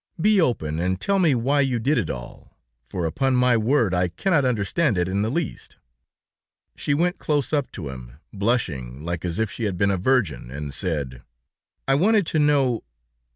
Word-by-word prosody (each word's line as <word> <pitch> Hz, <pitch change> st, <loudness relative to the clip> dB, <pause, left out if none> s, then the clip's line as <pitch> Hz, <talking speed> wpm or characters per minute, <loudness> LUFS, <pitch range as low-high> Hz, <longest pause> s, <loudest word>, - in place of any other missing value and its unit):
Be 205 Hz, +2 st, +4 dB
open, 80 Hz, -, 0 dB
and 90 Hz, +2 st, -1 dB
tell 195 Hz, -, +1 dB
me 160 Hz, -7 st, +4 dB
why 135 Hz, +5 st, +1 dB
you 130 Hz, -3 st, +1 dB
did 140 Hz, +7 st, +1 dB
it -, -, -2 dB
all, 60 Hz, -2 st, -8 dB, 0.3 s
for 85 Hz, +8 st, -4 dB
upon 130 Hz, +11 st, 0 dB
my 125 Hz, -1 st, +4 dB
word 115 Hz, -2 st, +2 dB
I 90 Hz, 0 st, +2 dB
cannot 145 Hz, -, +1 dB
understand 120 Hz, -, +1 dB
it 90 Hz, 0 st, +1 dB
in 95 Hz, +2 st, -1 dB
the 110 Hz, -, 0 dB
least." 165 Hz, +3 st, -4 dB, 1.0 s
She 145 Hz, -, 0 dB
went 175 Hz, +4 st, 0 dB
close 145 Hz, -1 st, -1 dB
up 145 Hz, -3 st, 0 dB
to 80 Hz, -9 st, -6 dB
him, 60 Hz, -2 st, -9 dB, 0.2 s
blushing 75 Hz, -, -2 dB
like 85 Hz, -1 st, -3 dB
as 85 Hz, -1 st, -2 dB
if 110 Hz, -3 st, 0 dB
she 115 Hz, -, -4 dB
had 95 Hz, -4 st, -2 dB
been 100 Hz, +2 st, +2 dB
a 95 Hz, -, 0 dB
virgin, 100 Hz, -, 0 dB
and 70 Hz, +2 st, -6 dB
said: 70 Hz, -7 st, -2 dB, 0.7 s
"I 135 Hz, -, +3 dB
wanted 200 Hz, +7 st, +3 dB
to 155 Hz, -, 0 dB
know 140 Hz, -5 st, +2 dB
110 Hz, 190 wpm, -23 LUFS, 85-145 Hz, 1.0 s, Be